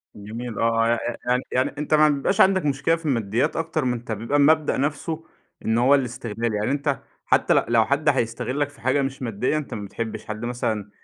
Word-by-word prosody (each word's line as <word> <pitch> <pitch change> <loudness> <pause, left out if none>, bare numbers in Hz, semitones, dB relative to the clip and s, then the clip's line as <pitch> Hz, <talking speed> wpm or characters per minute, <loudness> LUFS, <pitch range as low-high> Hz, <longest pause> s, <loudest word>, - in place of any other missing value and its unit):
جميل 110 +3 -6
آه، - - -1
آه 115 0 +2
يع 120 - +2 0.3
يع 125 - +2
يعني 130 +2 +1
أنت 150 +1 -2
ما 155 0 +6
ع - - +7
بيبقاش 145 +7 +1
عندك 190 -4 +4
مشكلة 140 +3 +2
في 165 -1 -11
الماديات 115 -5 0
أكتر 160 -3 -1
من 125 - +1
أنت 120 -1 -6
بيبقى 115 +7 -1
المبدأ 155 +1 +4
نفسه 155 +3 -2 0.4
إن 110 +1 +2
هو 130 +4 +5
الاستغلال، 120 -3 -2
يعني 105 +4 0
أنت 140 -1 0 0.3
حتى - - +3
ل - - +3
لو 115 -1 +4
حد 145 +2 +1
هيستغلك 130 +2 -1
في 140 -5 -18
حاجة 130 +3 +2
مش 135 0 -3
مادية 125 +5 -1
أنت 150 - -5
ما 105 -2 -5
بتحبش 110 +2 -5
حد 110 +2 -5
مثلًا 110 -4 -2
125 Hz, 210 wpm, -23 LUFS, 115-145 Hz, 0.4 s, ع